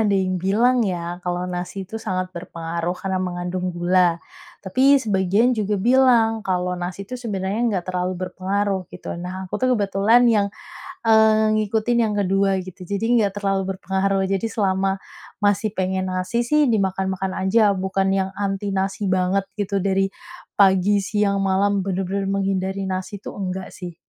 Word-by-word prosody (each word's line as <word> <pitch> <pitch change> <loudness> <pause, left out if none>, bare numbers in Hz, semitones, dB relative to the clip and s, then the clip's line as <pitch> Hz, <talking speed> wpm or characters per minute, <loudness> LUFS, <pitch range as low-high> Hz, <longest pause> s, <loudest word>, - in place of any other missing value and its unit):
ada 205 -2 +2
yang 185 -2 0
bilang 235 +7 +3
ya 175 -4 -2
kalau 180 0 -2
nasi 180 +2 -5
itu 220 +4 -7
sangat 185 -3 -3
berpengaruh 170 0 -4
karena 190 -1 -2
mengandung 180 0 -3
gula, 175 -1 +3 0.5
tapi 260 +9 +4
sebagian 210 0 +2
juga 210 -3 -1
bilang 230 0 +4
kalau 180 -2 -1
nasi 180 +3 -5
itu 230 - -15
sebenarnya 200 -2 -2
enggak 185 -5 -1
terlalu 180 0 -1
berpengaruh 190 0 -2
gitu, 180 - -7
nah 185 +1 -5
aku 185 - -5
tuh 255 -1 +3
kebetulan 205 +4 +3
yang, 205 -2 +3 0.6
eee, 220 -1 +5 0.2
ngikutin 220 +3 0
yang 210 - -2
ke-2 195 0 +2
gitu, 185 -1 -11
jadi 200 +2 -2
enggak 200 -3 +1
terlalu 195 -1 0
berpengaruh, 190 +1 0
jadi 195 +3 0
selama 195 -2 0 0.5
masih 205 +1 +1
pengen 185 0 -1
nasi 185 +6 -1
sih 300 +3 +4
dimakan-makan 190 -2 -1
aja, 200 +1 +3
bukan 190 +1 -1
yang 190 0 0
anti 200 0 -2
nasi 195 +1 -1
banget 185 +1 +1 0.2
gitu, 200 -1 -1
dari 195 0 +2 0.5
pagi, 195 +1 +4
siang, 200 -1 0
malam, 195 +1 +1
benar-benar 195 +1 -2
menghindari 195 0 -1
nasi 190 +2 -4
itu, - - -8
enggak 185 -1 -5
sih. 175 -2 -8
195 Hz, 155 wpm, -22 LUFS, 185-205 Hz, 0.6 s, eee